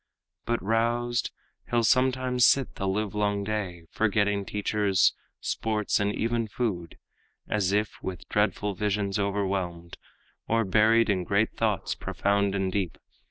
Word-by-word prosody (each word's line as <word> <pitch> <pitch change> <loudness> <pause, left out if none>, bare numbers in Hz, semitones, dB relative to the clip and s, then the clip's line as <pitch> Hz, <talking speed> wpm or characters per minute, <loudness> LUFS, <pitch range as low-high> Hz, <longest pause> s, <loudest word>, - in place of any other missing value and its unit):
But 120 -3 -1
roused, 120 +3 0 0.4
he'll 120 -1 +2
sometimes 130 0 +2
sit 135 -2 +2
the 95 - -3
livelong 105 0 0
day, 100 -5 -3
Forgetting 105 -2 +1
teachers, 105 -1 +2 0.3
sports 105 -2 0
and 105 0 +1
even 115 0 0
food, 105 -7 -3 0.5
As 100 -3 0
if 105 +1 -1
with 90 -2 -6
dreadful 105 0 0
visions 100 0 -1
overwhelmed, 95 -4 -2 0.5
Or 115 0 +2
buried 110 +3 +4
in 95 -2 0
great 100 +4 +1
thoughts 105 -5 0
profound 100 0 0
and 95 -1 0
deep. 95 -4 -2
105 Hz, 125 wpm, -27 LUFS, 100-115 Hz, 0.5 s, buried